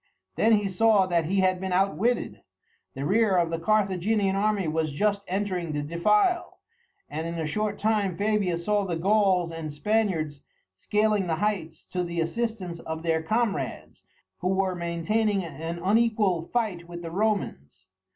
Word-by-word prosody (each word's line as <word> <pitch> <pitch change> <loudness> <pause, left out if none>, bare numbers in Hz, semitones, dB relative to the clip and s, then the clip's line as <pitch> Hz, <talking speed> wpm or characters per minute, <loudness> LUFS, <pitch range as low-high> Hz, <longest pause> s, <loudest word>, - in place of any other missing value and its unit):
Then 225 +1 +4
he 205 -2 +2
saw 200 +1 +4
that 170 -3 +1
he 190 +4 +1
had 185 -1 +2
been 190 -1 -3
outwitted. 195 +6 0 0.5
The 135 - -3
rear 200 +1 +3
of 170 -1 +1
the 165 - -2
Carthaginian 200 +1 +1
army 205 -2 +1
was 155 0 -1
just 200 +5 +1
entering 185 -4 -2
the 145 0 -2
defile, 210 - +1 0.5
and 160 +2 -4
in 170 - -4
a 165 -1 -2
short 210 +6 -2
time 205 -5 0
Fabius 200 -5 0
saw 210 -1 +2
the 180 -3 -2
Gauls 190 -1 +2
and 165 -2 -5
Spaniards 160 -4 0 0.3
scaling 210 - +1
the 165 - +1
heights 175 -4 -2
to 180 -1 -1
the 170 -1 -4
assistance 185 0 -2
of 160 0 -6
their 165 -1 +1
comrades, 220 +5 -2 0.4
who 180 - -2
were 190 0 +1
maintaining 190 +4 0
an 165 +1 -5
unequal 205 -5 +2
fight 205 -8 -1
with 175 0 -7
the 165 - -6
Romans. 165 - -2
190 Hz, 160 wpm, -26 LUFS, 165-210 Hz, 0.5 s, Then